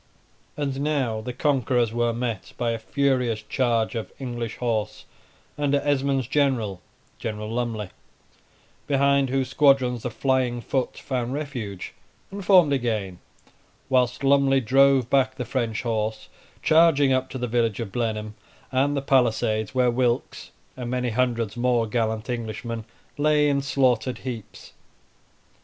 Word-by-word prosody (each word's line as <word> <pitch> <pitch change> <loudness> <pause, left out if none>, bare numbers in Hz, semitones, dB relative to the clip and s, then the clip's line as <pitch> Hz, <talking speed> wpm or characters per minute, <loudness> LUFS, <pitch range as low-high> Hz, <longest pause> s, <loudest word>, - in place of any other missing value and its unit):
And 140 -2 -2
now 135 -7 0
the 125 +3 -5
conquerors 125 -3 +1
were 120 0 +1
met 115 -1 -4
by 120 -1 0
a 115 - -3
furious 125 -4 0
charge 115 0 0
of 115 -2 -5
English 120 -4 -5
horse 110 -3 -2 0.5
under 145 -1 +2
Esmond's 135 -2 +1
general, 130 -9 0 0.4
General 105 -1 -4
Lumley, 115 -4 -3 1.0
behind 140 -1 +3
whose 130 -1 0
squadrons 130 -5 +3
the 125 - -3
flying 130 0 0
foot 130 +2 -2
found 125 -2 -3
refuge, 125 -10 -5 0.4
and 200 0 -6
formed 180 -6 +5
again, 110 -8 -2 0.7
whilst 125 0 +1
Lumley 135 -1 +4
drove 135 +1 +4
back 130 0 +2
the 125 - -4
French 115 -2 -2
horse, 110 -2 -2 0.3
charging 155 -4 +5
up 130 0 0
to - - -6
the 125 - -2
village 115 -3 0
of 115 -4 -4
Blenheim 110 -2 -2 0.4
and 140 +2 +1
the 135 - -2
palisades 110 -4 +1
where 125 -1 +3
Wilkes, 120 0 -1 0.3
and 125 -2 -5
many 125 -1 -1
hundred 115 -2 0
more 120 -1 +1
gallant 110 -1 -1
Englishmen, 115 -1 -4 0.3
lay 150 0 +3
in 140 -1 +1
slaughtered 130 -3 +1
heaps. 110 -6 -8
125 Hz, 135 wpm, -24 LUFS, 115-135 Hz, 1.0 s, formed